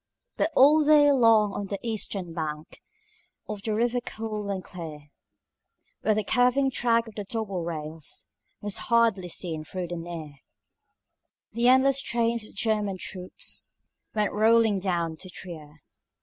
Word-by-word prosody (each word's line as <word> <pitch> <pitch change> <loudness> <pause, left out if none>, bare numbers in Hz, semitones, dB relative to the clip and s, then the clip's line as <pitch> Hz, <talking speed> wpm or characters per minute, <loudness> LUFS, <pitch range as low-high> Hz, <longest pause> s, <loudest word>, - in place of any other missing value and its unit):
But 310 - +1
all 300 +4 +6
day 295 -1 +6
long 225 -6 +4
on 205 - -4
the 200 - -3
eastern 200 -6 -1
bank 155 -2 -5 0.7
Of 210 -2 -5
the 215 0 -2
river 240 +2 +1
cool 215 -3 -5
and 190 -2 -3
clear, 155 -5 -9 0.9
Where 215 0 +2
the 215 - 0
curving 250 +5 +3
track 230 -2 +1
of 225 - -10
the 205 - -5
double 200 -4 -3
rails 155 -2 -5 0.3
Was 205 -1 0
hardly 230 -6 +3
seen 160 -2 -2
though 185 -1 -3
near, 165 -4 -6 1.2
The 235 +2 +2
endless 260 +2 +5
trains 235 -2 0
of - - -19
German 210 -2 0
troops 185 0 -4 0.5
Went 210 -1 +1
rolling 220 -1 +4
down 170 -4 -1
to 185 - -10
Trier. 155 -5 -10
205 Hz, 140 wpm, -26 LUFS, 175-230 Hz, 1.2 s, all